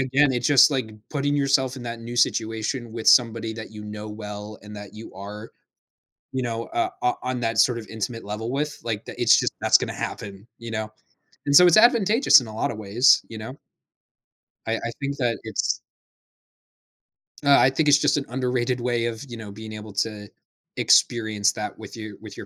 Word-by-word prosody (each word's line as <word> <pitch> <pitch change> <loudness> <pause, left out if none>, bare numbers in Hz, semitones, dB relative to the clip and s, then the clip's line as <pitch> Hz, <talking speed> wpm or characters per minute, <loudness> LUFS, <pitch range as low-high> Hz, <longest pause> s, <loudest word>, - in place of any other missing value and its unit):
again, 135 +2 +2
it's 125 - -1
just 145 -1 +6
like 130 -6 -2 0.2
putting 145 0 0
yourself 135 -2 +1
in 130 - -8
that 115 -1 -6
new 120 +1 -7
situation 115 +1 -1
with 115 -1 -6
somebody 115 -2 +4
that 110 -1 -8
you 105 -1 -10
know 105 0 -7
well 105 0 -8
and 105 +1 -11
that 100 -1 -10
you 110 +1 -10
are, 105 +3 -9 0.8
you 130 -1 -2
know, 115 -1 -3
uh 350 +1 -1
uh, 125 - +2
on 125 -1 -3
that 115 -1 -2
sort 120 -2 +4
of 110 - -9
intimate 110 +2 -5
level 105 +3 -5
with, 150 +1 -2
like, 110 -3 -3
that - - -8
it's - - +6
just - - -1
that's - - +5
gonna - - -4
happen, 100 +1 -6
you 115 0 -8
know? 110 -1 -4 0.5
And 140 - +1
so 180 - +9
it's 175 - +5
advantageous 225 - +6
in 125 - -8
a 110 - -9
lotta 115 - -1
ways, 110 +5 +3
you 110 - -8
know? 110 +5 -8 1.1
I 115 - 0
I 115 - -4
think 140 0 -3
that 120 -3 0
it's 110 -2 -2 1.6
Uh, 140 -1 +6
I 130 - +5
think 150 +3 +1
it's 145 - +7
just 145 - +2
an 140 - -2
underrated 125 0 -1
way 120 -1 -1
of, 115 0 -4
you 120 -2 -8
know, 110 -2 -9
being 110 +2 -9
able 105 -1 -9
to 105 0 -3 0.5
experience 110 -3 +3
that 105 - -6
with 110 0 -10
you 110 -3 -8
with 105 -3 -11
your - - -8
115 Hz, 200 wpm, -24 LUFS, 110-130 Hz, 1.6 s, so